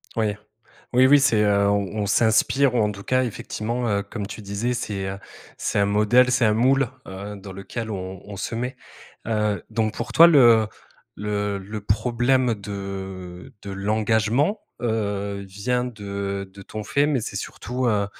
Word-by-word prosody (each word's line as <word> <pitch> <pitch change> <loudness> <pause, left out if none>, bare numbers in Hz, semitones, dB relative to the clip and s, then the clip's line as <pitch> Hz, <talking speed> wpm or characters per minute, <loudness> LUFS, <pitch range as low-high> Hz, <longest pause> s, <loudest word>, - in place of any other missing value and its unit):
Oui. 110 -2 0 0.6
Oui, 130 +1 +6
oui 145 +1 +7
c'est, 115 -6 +3
heu, 100 -1 +3
on 100 +1 0
on 100 - -1
s'inspire 120 +5 +3
ou, - - +2
en 105 - +2
tout 100 -1 -10
cas, 130 0 +2
effectivement, 120 +1 -3
heu, 100 -2 +1
comme 100 0 -6
tu 105 - -8
disais, 100 +5 -2
c'est, 100 -4 -3
heu, 95 +1 -5 0.4
c'est - - -1
un 100 - +4
modèle, 105 +5 +4
c'est 130 -1 +3
un 105 -1 +4
moule, 130 +3 +3 0.2
heu, 100 +2 -7
dans 100 0 -9
lequel 100 +4 -6
on 95 -2 -6
on 100 -1 -8
se 115 - -4
met, 125 +3 -3 0.5
heu, 105 -4 0
donc 110 -2 0
pour - - -5
toi, 165 - +9
le 120 -9 +6 0.5
le 105 0 -2
le 105 +2 -6
problème 120 +4 +1
de 95 -1 -7
de 100 - -7
l'engagement, 110 - +1 0.2
heu, 100 -3 -2
vient 125 +6 -1
de 100 -4 -4
de 100 - -10
ton 110 +2 -7
fait, 140 +6 +2
mais 145 -4 +1
c'est - - -5
surtout, 125 +1 -3
heu 105 -3 +1
105 Hz, 175 wpm, -23 LUFS, 100-120 Hz, 0.6 s, toi